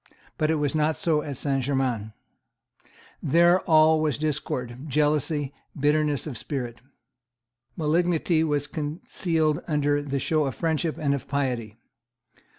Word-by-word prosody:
But 155 - +2
it 160 - +3
was 145 -2 0
not 155 0 +1
so 155 -3 +2
at 145 -3 -6
Saint 135 -1 0
Germains. 125 -5 -1 1.1
There 170 +4 +4
all 155 0 +6
was 150 -4 0
discord, 135 -4 -3
jealousy, 150 0 +1 0.3
bitterness 150 0 +2
of 130 -8 -5
spirit. 120 -1 -5 1.0
Malignity 165 +1 +2
was 145 -2 0
concealed 155 +1 -1
under 145 -2 +1
the 140 -1 -3
show 155 +2 +1
of 135 -4 -3
friendship 160 +1 -1
and 145 -2 +1
of 140 - -4
piety. 125 -6 -2
150 Hz, 130 wpm, -25 LUFS, 135-155 Hz, 1.1 s, all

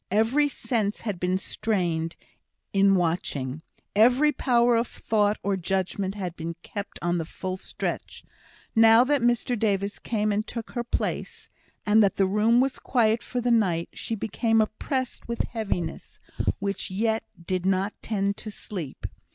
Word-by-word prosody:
Every 225 +9 +3
sense 225 -6 -1
had 205 -6 -3
been 180 +1 +1
strained 175 -5 -1 0.6
in 195 0 +5
watching 160 -5 -1 0.3
every 250 +8 +5
power 240 -3 +3
of 230 +1 +1
thought 210 -1 +1
or 200 0 +1
judgment 190 +1 -1
had 180 -4 -4
been 165 0 -5
kept 205 0 -6
on 175 0 +1
the - - -1
full 185 +3 -5
stretch. 185 - -5 0.5
Now 225 +1 +7
that 285 +1 +2
Mr 240 +1 +2
Davis 200 -1 0
came 215 -2 0
and 210 +2 -1
took 230 -2 -6
her 240 - -2
place, 240 - -3 0.4
and 210 +1 +5
that 200 -2 +3
the 195 - +3
room 210 +5 +3
was 265 +1 +1
quiet 230 -2 +2
for 250 0 -3
the 240 0 +1
night, 180 -8 +2
she 225 - -4
became 225 +2 +1
oppressed 255 +4 -2
with 235 0 -1
heaviness, 195 -8 -4 0.4
which 200 -1 -3
yet 220 +3 0 0.2
did 185 0 -1
not 195 +2 +1
tend 200 -2 -1
to 215 - -6
sleep. 180 -8 -7
210 Hz, 155 wpm, -26 LUFS, 190-230 Hz, 0.6 s, Now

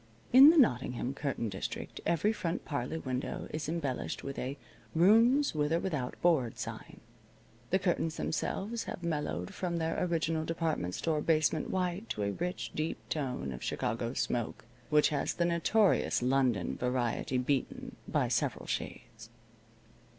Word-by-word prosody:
In 270 +4 +11
the 330 - +5
Nottingham 125 - +2
curtain 140 -5 -2
district 95 -2 -5
every 205 +6 +2
front 170 -4 -3
parlor 140 0 -3
window 130 0 -3
is 155 -1 -3
embellished 150 -6 -3
with 140 0 -5
a 135 +3 -4 0.4
"Rooms 230 - +5
With 150 -1 0
or 165 - +3
Without 150 -10 -3
Board" 145 -10 +2
sign. - - -7 0.7
The 190 - +3
curtains 175 -4 0
themselves 220 +7 -2
have 175 - -6
mellowed 150 - -2
from 175 -2 -2
their 165 +1 -1
original 165 -2 0
department 160 - -2
store 155 -2 0
basement 155 -1 +2
white 185 +3 -2
to 105 - -2
a 100 - 0
rich, 175 - -3
deep 155 +1 -2
tone 130 - -2
of 60 - -8
Chicago 115 +2 -2
smoke, 120 -2 -2 0.2
which 150 -1 +5
has 145 -2 -1
the 170 - +1
notorious 175 - +2
London 125 -7 +1
variety 125 0 -1
beaten 130 +1 -2
by - - +1
several - - -1
shades. 115 -1 -5
155 Hz, 145 wpm, -31 LUFS, 125-175 Hz, 0.7 s, In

